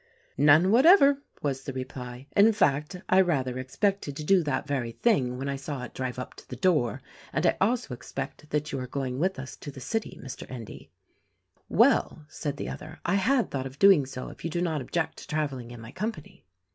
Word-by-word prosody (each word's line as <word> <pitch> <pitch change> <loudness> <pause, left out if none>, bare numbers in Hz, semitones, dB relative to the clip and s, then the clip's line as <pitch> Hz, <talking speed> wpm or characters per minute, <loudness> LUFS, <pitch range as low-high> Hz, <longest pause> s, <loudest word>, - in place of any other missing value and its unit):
"None 155 +6 +6
whatever," 280 - +6 0.2
was 135 -2 -1
the 135 0 -6
reply; 130 -1 -7
"in 215 +3 +6
fact 150 -4 +1
I 190 +1 +5
rather 130 -8 0
expected 145 +4 -1
to 155 - -5
do 190 +4 +4
that 145 -5 -1
very 130 -5 -2
thing 130 - +1
when 135 +2 -4
I 140 0 -2
saw 135 -1 -5
it 125 - -8
drive 130 -1 -4
up 125 - -6
to - - -14
the - - -5
door; 150 - +1 0.3
and - - 0
I - - +4
also 230 - +1
expect 135 +4 -7
that 150 0 -1
you 135 - -2
are 130 - -5
going 130 -1 -3
with 185 +4 0
us 135 0 -7
to - - -8
the 135 - -9
city, 220 - -3
Mr. 130 - -8
Endy." 120 -5 -9 0.8
"Well," 155 - +3
said 145 -1 -4
the - - -4
other, - - -8
"I 175 - +1
had 230 +6 +2
thought 135 -1 -2
of 135 +1 -12
doing 190 -8 +6
so 130 -1 -6
if - - -13
you 165 - -2
do 170 - -2
not 160 -4 0
object 160 +5 -2
to - - -11
traveling 145 -7 -2
in 120 -1 -9
my 115 +1 -10
company." 210 - -6
145 Hz, 210 wpm, -27 LUFS, 130-185 Hz, 0.8 s, None